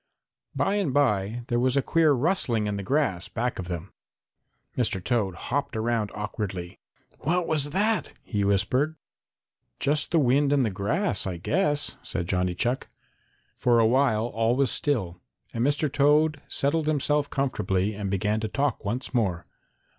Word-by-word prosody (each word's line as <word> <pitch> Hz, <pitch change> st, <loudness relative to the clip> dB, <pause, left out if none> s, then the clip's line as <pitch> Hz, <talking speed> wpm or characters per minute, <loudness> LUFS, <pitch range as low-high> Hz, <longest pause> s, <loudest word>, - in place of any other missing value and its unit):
By 205 Hz, -, +1 dB
and 165 Hz, -10 st, -1 dB
by 115 Hz, -4 st, +1 dB
there 120 Hz, -, +1 dB
was 130 Hz, +2 st, +2 dB
a 140 Hz, -, +2 dB
queer 165 Hz, -2 st, +3 dB
rustling 130 Hz, -, +1 dB
in 105 Hz, -1 st, -1 dB
the 100 Hz, -, -3 dB
grass 115 Hz, -, 0 dB
back 120 Hz, -1 st, -2 dB
of 90 Hz, -, -4 dB
them. 90 Hz, +1 st, -6 dB, 0.8 s
Mr. 115 Hz, -6 st, +1 dB
Toad 105 Hz, -6 st, 0 dB
hopped 140 Hz, -, -3 dB
around 110 Hz, -1 st, 0 dB
awkwardly. 100 Hz, -4 st, -5 dB, 0.4 s
"What 170 Hz, +5 st, 0 dB
was 155 Hz, -3 st, +1 dB
that?" 210 Hz, +7 st, 0 dB
he 105 Hz, -3 st, -1 dB
whispered. 115 Hz, +10 st, +1 dB, 0.8 s
"Just 145 Hz, +1 st, +1 dB
the 165 Hz, -, +2 dB
wind 140 Hz, 0 st, +3 dB
in 140 Hz, -2 st, +3 dB
the 110 Hz, -, 0 dB
grass, 100 Hz, -, -1 dB
I 90 Hz, -2 st, -3 dB
guess," 145 Hz, -, 0 dB
said 85 Hz, -3 st, -4 dB
Johnny 90 Hz, -1 st, 0 dB
Chuck. 120 Hz, +7 st, -1 dB, 0.7 s
For 120 Hz, -1 st, +3 dB
a 115 Hz, -, +5 dB
while 115 Hz, -2 st, +3 dB
all 115 Hz, 0 st, +1 dB
was 135 Hz, 0 st, +2 dB
still 95 Hz, -, -1 dB, 0.3 s
and 115 Hz, -, -1 dB
Mr. 145 Hz, +3 st, +1 dB
Toad 150 Hz, +2 st, +3 dB
settled 150 Hz, +3 st, 0 dB
himself 150 Hz, -1 st, +1 dB
comfortably 105 Hz, -7 st, 0 dB
and 100 Hz, -1 st, -4 dB
began 105 Hz, +3 st, 0 dB
to 110 Hz, -, -2 dB
talk 140 Hz, +1 st, -1 dB
once 120 Hz, +6 st, -3 dB
more. 95 Hz, -9 st, 0 dB
120 Hz, 160 wpm, -26 LUFS, 100-145 Hz, 0.8 s, a